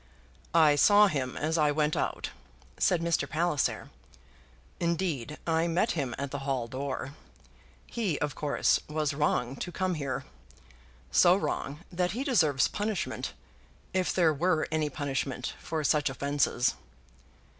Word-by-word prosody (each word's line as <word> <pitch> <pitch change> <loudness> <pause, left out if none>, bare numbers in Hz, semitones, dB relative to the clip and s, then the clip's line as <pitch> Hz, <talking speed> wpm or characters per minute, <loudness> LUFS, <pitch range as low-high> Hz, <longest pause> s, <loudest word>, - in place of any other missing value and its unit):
"I 155 -3 +6
saw 205 +7 +7
him 135 -9 -1
as 160 +2 0
I 150 -1 +4
went 150 0 +1
out," - - -2 0.5
said 180 -4 +3
Mr. 170 -1 0
Palliser. 160 -3 0 0.9
"Indeed, 165 -5 -1
I 165 0 +1
met 180 +7 +1
him 135 -7 -2
at 140 0 -4
the 140 - -3
hall 135 -3 -2
door. 135 +1 -4 0.7
He, 205 -10 -2
of 145 -1 -2
course, 150 0 +1
was 150 -1 -1
wrong 140 -3 0
to 180 - -5
come 185 +1 -1
here; 140 -5 -3 0.9
so 175 - +6
wrong, 150 -5 -3
that 180 0 0
he 250 +5 -2
deserves 160 - +3
punishment, 210 -2 -3 0.6
if 185 -1 +1
there 165 -4 +3
were 160 +1 +1
any 155 -1 0
punishment 135 -3 -3
for 160 -1 -3
such 145 0 +2
offences." 140 -2 +1
155 Hz, 135 wpm, -29 LUFS, 140-175 Hz, 0.9 s, saw